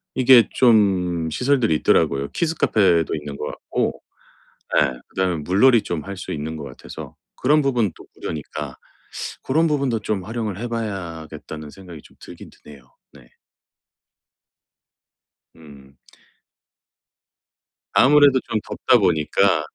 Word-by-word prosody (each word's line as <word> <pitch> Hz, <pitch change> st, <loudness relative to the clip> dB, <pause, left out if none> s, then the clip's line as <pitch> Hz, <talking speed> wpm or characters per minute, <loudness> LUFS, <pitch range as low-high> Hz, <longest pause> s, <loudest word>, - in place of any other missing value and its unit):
이게 125 Hz, -3 st, +6 dB
좀 95 Hz, -8 st, +2 dB
시설들이 125 Hz, -, +1 dB
있더라고요. 70 Hz, -2 st, +1 dB
키즈 165 Hz, -1 st, -1 dB
카페도 90 Hz, -, +2 dB
있는 75 Hz, -1 st, -7 dB
것 -, -, -5 dB
같고 -, -, -3 dB, 0.8 s
예 -, -, +3 dB, 0.2 s
그다음에 95 Hz, -2 st, -1 dB
물놀이 105 Hz, -, +4 dB
좀 85 Hz, -3 st, -5 dB
할 100 Hz, 0 st, -6 dB
수 -, -, -7 dB
있는 80 Hz, +1 st, -4 dB
것 80 Hz, -, -7 dB
같아서 -, -, -10 dB, 0.2 s
그런 150 Hz, +4 st, +3 dB
부분 125 Hz, -8 st, +1 dB
또 -, -, -14 dB
무료니까 75 Hz, -2 st, -6 dB, 0.7 s
'고런 160 Hz, +5 st, +2 dB
부분도 140 Hz, -6 st, 0 dB
좀 105 Hz, -3 st, -3 dB
활용을 110 Hz, -3 st, -4 dB
해 120 Hz, +3 st, -5 dB
봐야겠다.'는 85 Hz, -8 st, -6 dB
생각이 85 Hz, -2 st, -12 dB
좀 -, -, -20 dB
들긴 -, -, -12 dB
드네요 70 Hz, -3 st, -16 dB, 0.3 s
네. 65 Hz, -4 st, -19 dB, 2.2 s
음. 70 Hz, -4 st, -16 dB, 2.0 s
아무래도 145 Hz, -1 st, +5 dB
좀 110 Hz, -, 0 dB
덥다 125 Hz, -, +3 dB
보니까 80 Hz, -7 st, +2 dB
95 Hz, 255 characters per minute, -21 LUFS, 80-120 Hz, 2.2 s, 이게